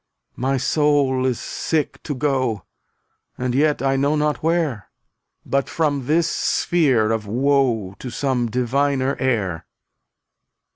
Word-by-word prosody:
My 135 Hz, +2 st, 0 dB
soul 135 Hz, -1 st, +2 dB
is 125 Hz, -3 st, -1 dB
sick 155 Hz, -3 st, -2 dB
to 145 Hz, -, -4 dB
go 130 Hz, -, 0 dB, 0.7 s
And 125 Hz, -1 st, -2 dB
yet 145 Hz, +1 st, +2 dB
I 135 Hz, 0 st, +2 dB
know 140 Hz, +3 st, +2 dB
not 150 Hz, 0 st, 0 dB
where 160 Hz, -, -1 dB, 0.3 s
— -, -, -53 dB
But 140 Hz, 0 st, 0 dB
from 145 Hz, -5 st, -1 dB
this 165 Hz, +2 st, +2 dB
sphere 130 Hz, -11 st, +1 dB
of 110 Hz, -2 st, -2 dB
woe 120 Hz, -4 st, +1 dB
To 130 Hz, -, -6 dB
some 125 Hz, -2 st, -1 dB
diviner 130 Hz, +3 st, 0 dB
air. 100 Hz, -10 st, -1 dB
135 Hz, 130 wpm, -21 LUFS, 120-145 Hz, 0.7 s, soul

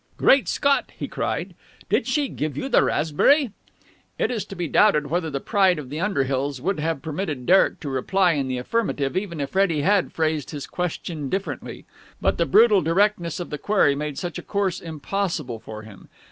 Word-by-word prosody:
"Great 270 Hz, 0 st, +4 dB
Scott!" 280 Hz, -1 st, +1 dB
he -, -, -4 dB
cried. -, -, -3 dB, 0.3 s
"Did -, -, +1 dB
she 295 Hz, -2 st, +1 dB
give 150 Hz, -, -4 dB
you 265 Hz, -, -2 dB
the -, -, +4 dB
raspberry?" 240 Hz, -, +2 dB, 0.7 s
It -, -, 0 dB
is 225 Hz, -4 st, -2 dB
to 195 Hz, -, -9 dB
be 175 Hz, -2 st, -3 dB
doubted 150 Hz, -5 st, +3 dB
whether 170 Hz, -1 st, 0 dB
the 140 Hz, -2 st, -3 dB
pride 190 Hz, +1 st, +2 dB
of 140 Hz, -3 st, -8 dB
the 150 Hz, -, -4 dB
Underhills 140 Hz, -7 st, -1 dB
would 180 Hz, +6 st, -1 dB
have 160 Hz, -2 st, -2 dB
permitted 155 Hz, -5 st, -4 dB
Derek 190 Hz, +6 st, +4 dB
to 150 Hz, -, -4 dB
reply 180 Hz, +8 st, +2 dB
in 140 Hz, -4 st, -1 dB
the 130 Hz, -1 st, -2 dB
affirmative, 145 Hz, -, -1 dB
even 185 Hz, -4 st, -3 dB
if 140 Hz, -, -3 dB
Freddie 190 Hz, -6 st, +2 dB
had 195 Hz, +4 st, +2 dB
phrased 155 Hz, -3 st, -1 dB
his 145 Hz, -3 st, -6 dB
question 165 Hz, -4 st, -4 dB
differently; 195 Hz, +5 st, -4 dB, 0.3 s
but -, -, 0 dB
the -, -, +2 dB
brutal 215 Hz, -4 st, +5 dB
directness 175 Hz, 0 st, +1 dB
of 175 Hz, -, -6 dB
the 150 Hz, -, -4 dB
query 195 Hz, -7 st, +3 dB
made 145 Hz, 0 st, -4 dB
such 175 Hz, -4 st, -4 dB
a -, -, -7 dB
course 200 Hz, -3 st, -1 dB
impossible 160 Hz, -, -3 dB
for 110 Hz, -1 st, -9 dB
him. 110 Hz, -3 st, -14 dB
165 Hz, 190 wpm, -23 LUFS, 145-195 Hz, 0.7 s, brutal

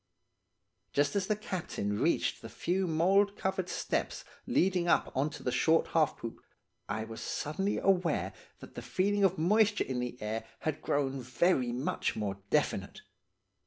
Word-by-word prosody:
"Just 145 Hz, +3 st, +2 dB
as 195 Hz, -2 st, +1 dB
the 215 Hz, -, +2 dB
captain 165 Hz, -, -3 dB
reached -, -, +1 dB
the -, -, -8 dB
few 185 Hz, +2 st, -1 dB
mould 195 Hz, +5 st, +3 dB
covered 190 Hz, -1 st, -1 dB
steps -, -, -2 dB, 0.2 s
leading 180 Hz, -1 st, +2 dB
up -, -, +3 dB
on 140 Hz, +3 st, +1 dB
to -, -, -10 dB
the 125 Hz, -, 0 dB
short 160 Hz, +5 st, +3 dB
half 155 Hz, -2 st, +2 dB
poop, 115 Hz, -, -7 dB, 0.5 s
I 110 Hz, -, -1 dB
was 110 Hz, 0 st, -8 dB
suddenly 190 Hz, +7 st, -2 dB
aware 170 Hz, -, +1 dB, 0.3 s
that -, -, -11 dB
the -, -, -6 dB
feeling 200 Hz, +2 st, +1 dB
of 190 Hz, -1 st, +3 dB
moisture 205 Hz, +5 st, +3 dB
in 130 Hz, -2 st, -3 dB
the 125 Hz, 0 st, -4 dB
air 110 Hz, +1 st, -3 dB, 0.2 s
had 155 Hz, -1 st, -2 dB
grown 135 Hz, -2 st, 0 dB
very 125 Hz, +1 st, +2 dB
much 125 Hz, +4 st, -1 dB
more 100 Hz, -2 st, -3 dB
definite. -, -, 0 dB
160 Hz, 160 wpm, -31 LUFS, 125-190 Hz, 0.5 s, mould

